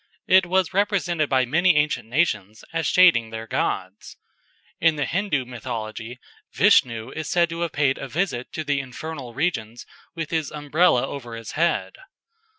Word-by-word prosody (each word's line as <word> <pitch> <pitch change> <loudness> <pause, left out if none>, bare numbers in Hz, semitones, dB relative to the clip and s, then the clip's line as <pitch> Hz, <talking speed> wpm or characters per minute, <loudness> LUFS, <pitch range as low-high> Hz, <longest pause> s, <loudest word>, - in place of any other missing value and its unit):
It 185 -1 +5
was 185 0 +1
represented 185 -6 +1
by 130 -1 +3
many 175 +7 +3
ancient 145 -6 0
nations 110 - -1
as 165 0 0
shading 170 -12 +5
their 110 0 -6
gods. 95 -2 -3 0.6
In 165 -1 +3
the 145 -2 -1
Hindoo 180 -8 -1
mythology 115 -1 -6 0.4
Vishnu 115 0 +3
is 160 -1 -5
said 170 -1 +2
to 165 0 -5
have 170 -2 -1
paid 140 -2 +1
a 135 - -5
visit 135 -3 -2
to 155 - -3
the 145 -2 0
infernal 135 -1 -7
regions 120 -7 -2 0.3
with 165 -3 -5
his 160 -3 -1
Umbrella 150 -2 +2
over 120 -5 -7
his 115 -1 -8
head. 170 +2 0
145 Hz, 155 wpm, -23 LUFS, 120-170 Hz, 0.6 s, It